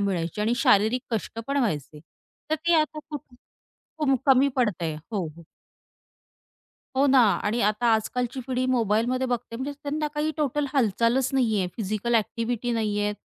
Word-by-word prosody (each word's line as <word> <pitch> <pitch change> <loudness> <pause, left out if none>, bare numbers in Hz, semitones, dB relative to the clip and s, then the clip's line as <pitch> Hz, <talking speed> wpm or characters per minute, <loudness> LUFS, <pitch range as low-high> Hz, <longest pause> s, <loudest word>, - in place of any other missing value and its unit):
मिळायची 185 -1 -1
आणि 225 +3 +2
शारीरिक 245 0 +3
कष्ट 225 +1 -3
पण 280 +1 -1
व्हायचे. 150 - -2 0.5
तर 315 - +3
ते 345 - +5
आता 305 0 -2
खूप, 295 -3 -4 0.8
खूप 270 -4 +2
कमी 270 +1 +6
पडतंय. 175 -10 0 0.2
हो, 190 -5 -1
हो. 160 +2 -11 1.5
हो 280 +2 +4
ना, 265 -1 +5 0.3
आणि 225 +3 0
आता 210 +3 +1
आजकालची 245 +3 -2
पिढी 255 0 -1
मोबाईलमध्ये 245 +1 +1
बघते 240 -1 -3
म्हणजे 270 +3 -4
त्यांना 300 +1 -2
काही 300 +1 0
टोटल 295 -1 0
हालचालच 240 +1 +2
नाहीये, 220 -8 +2
फिजिकल 215 +2 -1
एक्टिव्हिटी 230 +2 -1
नाहीये, 210 -2 0
235 Hz, 145 wpm, -25 LUFS, 210-265 Hz, 1.5 s, कमी